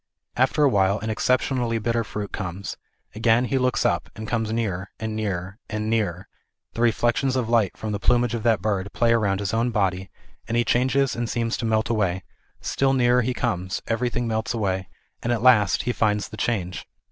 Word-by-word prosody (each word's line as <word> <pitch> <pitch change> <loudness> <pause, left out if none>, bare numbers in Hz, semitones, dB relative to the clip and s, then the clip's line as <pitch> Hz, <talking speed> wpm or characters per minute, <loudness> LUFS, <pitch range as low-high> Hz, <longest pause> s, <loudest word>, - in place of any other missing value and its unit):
After 130 +4 +2
a - - +7
while 100 -4 +3
an 110 +1 -3
exceptionally 125 0 +1
bitter 115 +1 0
fruit 105 -1 -5
comes; 95 +1 -5 0.4
again 115 +3 +3
he 135 +1 0
looks 125 -1 +1
up, - - +1
and 110 0 -7
comes 110 -2 -1
nearer, 100 -5 -2
and 110 -1 -3
nearer, 95 -2 -3
and 110 0 -2
nearer; 100 -5 -1 0.5
the 115 - -4
reflections 120 +3 +2
of 125 -3 -1
light 115 -5 +2
from 110 - -4
the 100 - -2
plumage 120 +1 +2
of 115 - -2
that 110 -4 +2
bird 100 -2 -1
play 115 -1 +3
around 100 -4 +1
his 100 0 -2
own 115 +2 +1
body, 95 -4 0 0.4
and 115 +1 -1
he 120 - +2
changes 130 +2 +2
and 120 -1 -2
seems 115 -1 -1
to 115 - -3
melt 110 -1 +1
away; 95 -5 0 0.4
still 135 0 +1
nearer 125 -1 +4
he 125 +1 -1
comes 95 -6 -2
everything 120 +1 -1
melts 110 +1 -1
away, 95 -4 -1 0.3
and 120 - -1
at 120 -1 0
last 105 -6 +5
he 125 - 0
finds 105 -3 0
the 110 - -8
change. 95 -6 -2
115 Hz, 195 wpm, -24 LUFS, 100-120 Hz, 0.5 s, a